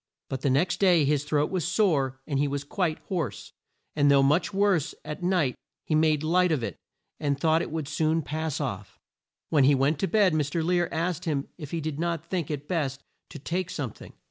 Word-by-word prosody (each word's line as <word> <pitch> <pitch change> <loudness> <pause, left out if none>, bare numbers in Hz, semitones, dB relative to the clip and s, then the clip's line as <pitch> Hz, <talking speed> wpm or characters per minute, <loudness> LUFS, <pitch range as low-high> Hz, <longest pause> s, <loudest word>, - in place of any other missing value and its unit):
But 135 -1 -4
the 140 - +1
next 175 +7 +1
day 175 -6 +5
his 145 0 +1
throat 150 0 +1
was 185 -3 -1
sore 140 - +1
and 140 -3 -1
he 145 - +2
was 140 0 -3
quite 160 +1 -1
hoarse; 160 - -4 0.4
and 145 -1 +4
though 140 -1 +5
much 150 +9 +2
worse 195 -6 +1
at 150 +3 -6
night 175 -8 +1 0.3
he - - -1
made 155 -1 +3
light 180 +2 +3
of 145 -7 0
it - - -3 0.4
and 145 -2 -1
thought 160 +1 +3
it - - -4
would 155 -2 -4
soon 155 +2 +1
pass 155 -1 -3
off. 100 - -5 0.5
When 145 -4 +4
he 140 +1 +5
went 140 +3 +1
to 195 - +1
bed 205 -5 +3
Mr. 155 +1 0
Lear 175 0 +1
asked 170 0 -2
him 145 -4 -1
if 150 -4 -7
he 165 +1 -3
did 155 -1 -4
not 170 -1 -2
think 170 -3 -3
it 145 -1 -4
best 140 -6 -2 0.3
to - - -9
take 175 +5 -3
some 135 -10 -3
thing. - - -13
155 Hz, 215 wpm, -27 LUFS, 140-170 Hz, 0.5 s, day